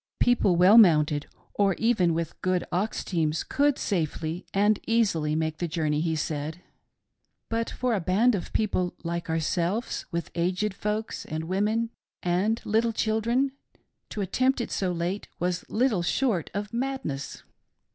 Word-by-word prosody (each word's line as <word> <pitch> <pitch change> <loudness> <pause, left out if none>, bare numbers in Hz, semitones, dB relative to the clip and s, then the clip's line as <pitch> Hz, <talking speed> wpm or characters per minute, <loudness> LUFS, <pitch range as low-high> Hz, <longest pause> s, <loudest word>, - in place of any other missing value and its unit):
People 240 -7 +3
well 185 +6 +7
mounted, 150 -7 +4 0.3
or 195 -2 +2
even 195 -8 +2
with 165 0 -4
good 185 -1 +1
ox 195 +5 -1
teams, 160 -3 0
could 285 0 +1
safely 165 -2 -2
and 205 +1 +3
easily 180 -10 +2
make 160 0 -1
the 175 - -1
journey, 155 -2 0
he 165 -1 0
said, 155 +1 -3 0.9
but 230 0 -1
for 250 -1 -1
a 210 - +1
band 200 +8 +3
of 185 -5 -3
peo 220 - +2
ple 180 -3 -1
'like 170 0 -3
ourselves, 170 +7 -1
with 170 0 -3
aged 180 +4 0
folks, 210 +2 -3
and 155 +1 -4
women, 210 +6 0 0.3
and 190 +6 +1
little 225 +2 +2
children, 230 +5 +1 0.6
to 210 - -4
attempt 255 +8 +1
it 235 - -3
so 185 -2 0
late 175 +3 -3
was 180 0 -2
little 225 -5 +2
short 195 - 0
of 205 +2 -4
madness. 240 - -3
185 Hz, 150 wpm, -27 LUFS, 165-225 Hz, 0.9 s, well